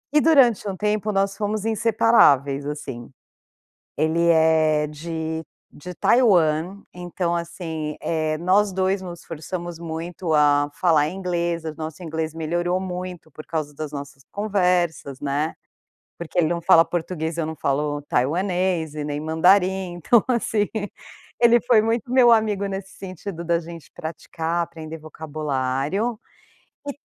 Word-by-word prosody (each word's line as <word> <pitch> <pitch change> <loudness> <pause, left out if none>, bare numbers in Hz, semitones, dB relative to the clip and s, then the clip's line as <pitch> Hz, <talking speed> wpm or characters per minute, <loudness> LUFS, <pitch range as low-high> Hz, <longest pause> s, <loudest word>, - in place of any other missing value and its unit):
E 300 - +6
durante 255 - +4
um 190 - -5
tempo 210 0 0
nós 195 0 0
fomos 210 0 -2
inseparáveis 210 - +3
assim, 135 -5 -6 0.9
ele 165 +2 +2
é 160 -2 +4
de 160 +1 -4 0.3
de 180 +5 -9
Taiwan, 185 -5 +3
então 175 0 -3
assim, 165 -3 -4
é, 155 -1 -1
nós 190 +3 +2
2 190 +1 0
nos 175 -2 -8
forçamos 170 +1 -6
muito 165 +1 -4
a 145 -1 +4
falar 155 -4 +3
inglês, 175 -2 -2
o 160 -1 -4
nosso 155 +2 -6
inglês 160 -1 -3
melhorou 175 +3 -1
muito 180 -3 -6
por 155 - -11
causa 155 -3 -3
das 155 -1 -5
nossas 140 -2 -8
conversas, 180 -9 0
né, 145 +2 -1 0.7
porque 170 +1 -8
ele 160 -3 +4
não 170 0 -1
fala 165 -1 +6
português, 165 -1 -3
eu 160 - 0
não 160 - -4
falo 145 +1 -1
taiwanês 175 +3 0
e 150 -1 -4
nem 145 0 -3
mandarim. 180 +3 +2
Então 210 +6 +3
assim 220 -4 +1 0.7
ele 235 0 +6
foi 240 -3 +5
muito 235 +3 -1
meu 250 -2 +6
amigo 215 -3 +2
nesse 195 0 -6
sentido 185 -2 -7
da 170 0 +2
gente 170 -1 -10
praticar, 165 +1 -3
aprender 160 -1 -8
vocabulário 155 - -2 0.7
e 285 - -4
170 Hz, 135 wpm, -23 LUFS, 155-190 Hz, 0.9 s, E